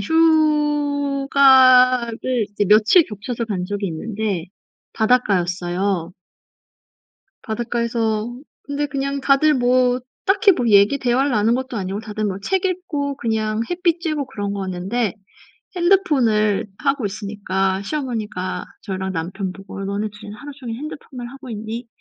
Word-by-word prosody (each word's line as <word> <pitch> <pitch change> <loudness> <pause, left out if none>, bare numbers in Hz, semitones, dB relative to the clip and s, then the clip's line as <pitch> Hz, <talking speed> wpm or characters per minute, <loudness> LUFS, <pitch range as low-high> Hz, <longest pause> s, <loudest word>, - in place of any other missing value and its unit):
휴가를 275 -5 +3
이제 205 -1 -1
며칠 215 - +6
겹쳐서 230 +3 -5
간 185 -4 -2
적이 205 +1 -3
있는데 195 +1 -3 0.5
바닷가였어요. 185 -5 0 1.3
바닷가에서 230 0 -2 0.3
근데 285 +1 -2
그냥 275 0 -3
다들 290 +3 +4
뭐 250 0 +2 0.2
딱히 395 +1 +5
뭐 245 -7 -1
얘기 205 +6 +5
대화를 260 +3 +1
나눈 225 +1 +2
것도 260 -1 -3
아니고 195 0 -3
다들 215 -1 -4
뭐 195 -2 -2
책 380 - 0
읽고 330 -7 -2
그냥 220 -3 -1
햇볕 345 -1 +1
쬐고 305 -4 -2
그런 200 -1 -4
거였는데 195 +4 -2 0.6
핸드폰을 260 - +2
하고 275 -5 0
있으니까 195 -2 -2
시어머니가 225 -9 -3 0.2
저랑 190 -2 -4
남편 185 +3 -3
보고 195 0 -10
"너네 205 +2 -2
2 210 +1 -13
이는 205 +1 -8
하루 290 0 -9
종일 240 -4 -6
핸드폰만 270 -5 -8
하고 270 -1 -11
있니?" 225 +2 -6
235 Hz, 285 characters per minute, -21 LUFS, 205-275 Hz, 1.3 s, 며칠